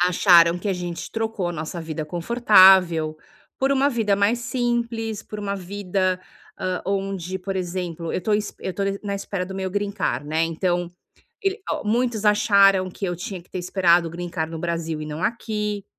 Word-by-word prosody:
acharam 175 -1 +5
que 190 - -4
a - - +2
gente 175 -2 -5
trocou 225 -5 -2
a - - -3
nossa 165 +1 -5
vida 160 -1 -4
confortável, 180 -3 +5 0.4
por 270 +1 +1
uma 275 +1 +3
vida 220 -6 +1
mais 205 +4 +2
simples, 235 -3 -2
por 210 - -8
uma 200 -1 -2
vida, 185 -1 -2 0.4
ah, 185 -1 -2
onde, 195 -2 -2
por 195 +1 -4
exemplo, 175 -2 -4
eu - - -1
tô 215 - -1
es 210 0 0
eu 185 - -5
tô 200 - -2
n 195 0 -1
na 200 -1 -3
espera 195 -2 -4
do 190 - -7
meu 190 -1 -3
greencard, 200 -9 -2
né. 160 +2 0
Então, 175 +1 -1 0.5
el 390 +1 0
ó, - - -2
muitos 230 0 0
acharam 200 -2 +5
que 195 - -6
eu 175 -1 -2
tinha 180 0 -6
que - - -30
ter - - -4
esperado 175 -1 +3
o - - -10
greencard 170 -2 -4
no 165 - -5
Brasil 165 -2 -3
e 150 - -6
não 155 +2 -6
aqui. 210 -2 -2
190 Hz, 190 wpm, -23 LUFS, 175-210 Hz, 0.5 s, acharam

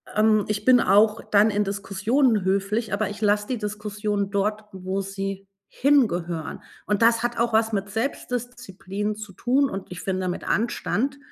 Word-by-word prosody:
Ähm, 215 -1 +3
ich 210 0 -2
bin 255 +2 +6
auch 210 +2 +4
dann 210 +1 +5
in 210 0 +1
Diskussionen 205 +4 +1
höflich, 200 +4 0
aber 200 0 0
ich 205 +1 -8
lasse 210 -1 +1
die 255 - -2
Diskussion 210 -1 -3
dort, 210 +2 -1
wo 190 +1 -3
sie 195 0 -5 0.2
hingehören 180 - +1 0.2
und 210 +1 0
das 230 0 +4
hat 240 0 -2
auch 235 0 +1
was 220 0 +2
mit 200 0 -2
Selbstdisziplin 225 -4 -4
zu 210 -2 -9
tun 260 +7 +1
und 195 -1 -6
ich 180 -1 -7
finde 185 -1 -2
mit 180 - -4
Anstand, 240 +4 -1
210 Hz, 165 wpm, -24 LUFS, 195-230 Hz, 0.2 s, bin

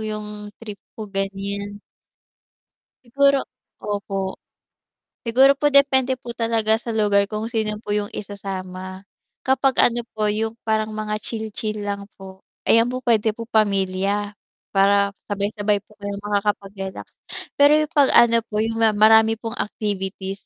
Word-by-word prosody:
'yung 210 -1 -6
trip 210 -3 -8 0.2
ko 220 - -6
gan'yan. 200 +1 -4 1.2
Siguro 275 +2 +3 0.4
opo. 195 -2 -3 0.9
Siguro 265 +4 +6
po 295 - +4
depende 270 -2 +3
po 245 -2 -8
talaga 225 -1 +1
sa 235 - -11
lugar 205 -3 +2
kung 220 +2 -4
sino 215 -2 -1
po 205 - -3
'yung 205 0 -1
isasama, 185 -2 -7 0.4
kapag 265 0 +2 0.2
ano 240 - -2 0.2
po 215 - 0
'yung 220 +2 -1
parang 220 -1 0
mga 215 0 -4
chill-chill 215 -1 -4
lang 200 0 -4
po. 190 -1 -12 0.2
Ayan 230 +1 +4
po 255 0 -5
puwede 225 -3 +3
po 230 - -6
pamilya, 200 -1 0 0.4
para 200 0 +3 0.2
sabay-sabay 205 0 -1
po - - -23
kayong 200 0 -5
makakapag-relax, 200 -2 -2 0.5
pero 285 +1 +6
'yung 305 0 +2
'pag 285 -4 +3
ano 230 -1 +6
po 210 0 -2
'yung 225 0 -2 0.2
marami 220 +1 +6
pong 225 0 -6
activities, 195 -2 -4
210 Hz, 135 wpm, -22 LUFS, 200-230 Hz, 1.2 s, Siguro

